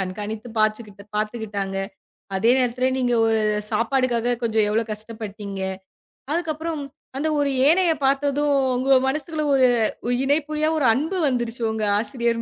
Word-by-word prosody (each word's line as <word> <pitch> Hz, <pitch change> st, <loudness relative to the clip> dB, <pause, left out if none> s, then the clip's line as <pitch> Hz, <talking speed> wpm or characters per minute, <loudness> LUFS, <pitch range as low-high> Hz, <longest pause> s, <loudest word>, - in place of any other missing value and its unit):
கண்காணித்து 210 Hz, +4 st, -5 dB
பாத்துக்குட்டு 215 Hz, -2 st, -1 dB
பாத்துக்கிட்டாங்க. 210 Hz, -3 st, -3 dB, 0.6 s
அதே 225 Hz, +5 st, +3 dB
நேரத்துல 255 Hz, 0 st, +1 dB
நீங்க 250 Hz, -1 st, +1 dB
ஒரு 225 Hz, 0 st, +2 dB, 0.3 s
சாப்பாட்டுக்காக 245 Hz, -1 st, +1 dB
கொஞ்சோ 225 Hz, -1 st, +1 dB
எவ்ளோ 225 Hz, +2 st, +2 dB
கஷ்டபட்டிங்க. 210 Hz, -2 st, -7 dB, 0.7 s
அதுக்கப்புறம் 320 Hz, -2 st, -2 dB, 0.4 s
அந்த 305 Hz, -, -1 dB
ஒரு 285 Hz, -1 st, +1 dB
யனைய 335 Hz, +4 st, +5 dB
பாத்தததும் 285 Hz, +1 st, +2 dB, 0.2 s
உங்க 265 Hz, +1 st, +4 dB
மனசுல 305 Hz, +3 st, -2 dB
ஒரு 260 Hz, -2 st, +5 dB, 0.6 s
இணைப்புரியா 300 Hz, +2 st, +1 dB
ஒரு 280 Hz, -, +1 dB
அன்பு 320 Hz, +9 st, -1 dB
வந்துருச்சு 240 Hz, -2 st, -2 dB
உங்க 220 Hz, -1 st, -2 dB, 0.2 s
ஆசிரியர் 235 Hz, -1 st, -1 dB
245 Hz, 120 wpm, -23 LUFS, 220-285 Hz, 0.7 s, யனைய